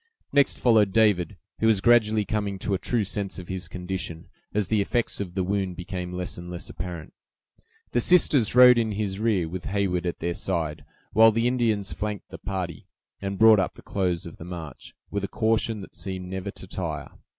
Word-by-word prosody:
Next 140 -1 +3
followed 110 -5 +4
David, 105 -5 +3 0.2
who 110 - +3
was 110 -3 +4
gradually 110 -1 +4
coming 100 -1 -2
to 100 +2 -2
a 95 - 0
true 120 -3 0
sense 100 0 -3
of 90 -2 -9
his 95 -2 -4
condition, 90 -2 -5 0.2
as 105 -2 0
the 105 0 +2
effects 120 +1 -1
of 90 -3 -6
the 95 - +1
wound 95 -1 -1
became 90 0 -5
less 90 -1 -4
and 90 0 -8
less 85 -1 -6
apparent. 85 -3 -7 0.8
The 120 - +2
sisters 140 - +4
rode 125 -1 +9
in 110 -2 0
his 100 -1 -2
rear, 105 -7 +1
with 90 +2 -6
Heyward 95 -3 0
at 85 - -2
their 85 +1 -2
side, 85 -5 -3 0.3
while 110 +2 +7
the 115 +2 0
Indians 115 -6 0
flanked 105 0 -4
the - - -9
party, 90 -5 -5 0.3
and 100 0 -3
brought 110 -1 +7
up 95 - -1
the - - -14
close 90 -2 -1
of 85 - -9
the - - -9
march, 85 -3 -8 0.2
with 100 -1 -2
a - - -1
caution 110 +1 0
that - - -11
seemed 95 -1 -5
never 95 +1 -4
to 95 - -9
tire. 85 -5 -5
95 Hz, 200 wpm, -26 LUFS, 90-110 Hz, 0.8 s, rode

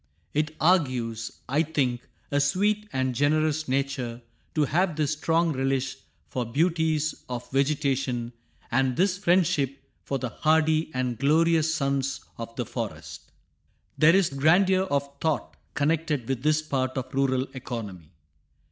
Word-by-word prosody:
It 155 +1 0
argues, 130 -10 +1 0.2
I 140 +4 +2
think, 135 -6 0 0.3
a 145 - +2
sweet 205 +9 +1
and 130 -1 0
generous 155 +3 +1
nature 130 -3 -2 0.3
to 155 -2 +3
have 175 +3 +1
this 150 -2 0
strong 165 +2 +1
relish 135 0 -1 0.3
for 125 - -2
beauties 155 +4 +1 0.2
of 125 -1 -5
vegetation, 135 -3 0 0.4
and 130 0 +1
this 185 0 +2
friendship 160 -8 +2 0.2
for 135 - -2
the 125 -2 -3
hardy 155 +5 +2
and 125 -2 -1
glorious 160 +2 +3
sons 140 -2 -1 0.2
of 115 0 -7
the 120 - -2
forest. - - -6 0.6
There 165 +3 +6
is 195 -5 +3
a - - -8
grandeur 185 +6 +4
of 140 -5 0
thought 160 -2 -1 0.2
connected 150 -4 0
with 135 -2 -2
this 155 +2 +2
part 130 -4 -1
of 130 0 -4
rural 130 -1 +1
economy. 105 - -7
140 Hz, 140 wpm, -26 LUFS, 130-160 Hz, 0.6 s, There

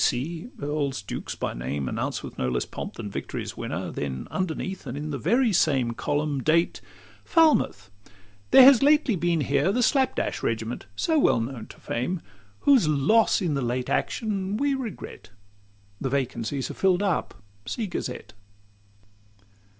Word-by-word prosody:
B. - - +4
C." 160 - -1
Earls, 145 - -2
dukes, - - -5
by - - -3
name 65 +3 -3
Announced - - -3
with - - -8
no 65 - 0
less 60 -1 -1
pomp - - -7
than 100 - -6
victory's - - -5
winner: - - -4
Then 65 -3 -4
underneath, 185 -1 -3
and 125 +2 -5
in 150 +1 -4
the 140 - -3
very 235 - +2
same 135 -8 +2
Column; 145 +3 -1
date, 165 +5 +2 0.4
"Falmouth. 295 - +2 0.6
There 265 - +9
has 265 -2 +8
lately 290 -5 +4
been 170 -2 +1
here 140 +6 +2
The 245 +4 +1
Slap 265 +2 +2
dash - - -2
regiment, 115 -1 -3
so 320 - +1
well 120 - +4
known 115 0 -5
to - - -13
fame, 165 +10 -2 0.4
Whose 265 - +5
loss 170 +10 +3
in 165 -4 0
the 140 - -1
late 125 +1 -2
action 200 -2 -1
we 280 +3 +1
regret: 255 -7 -6 0.7
The 135 - -2
vacancies 130 0 -2
are - - -7
fill'd 190 0 +2
up 190 -5 -1 0.3
see 225 - -2
Gazette." 175 -9 -5
150 Hz, 160 wpm, -26 LUFS, 125-210 Hz, 0.7 s, There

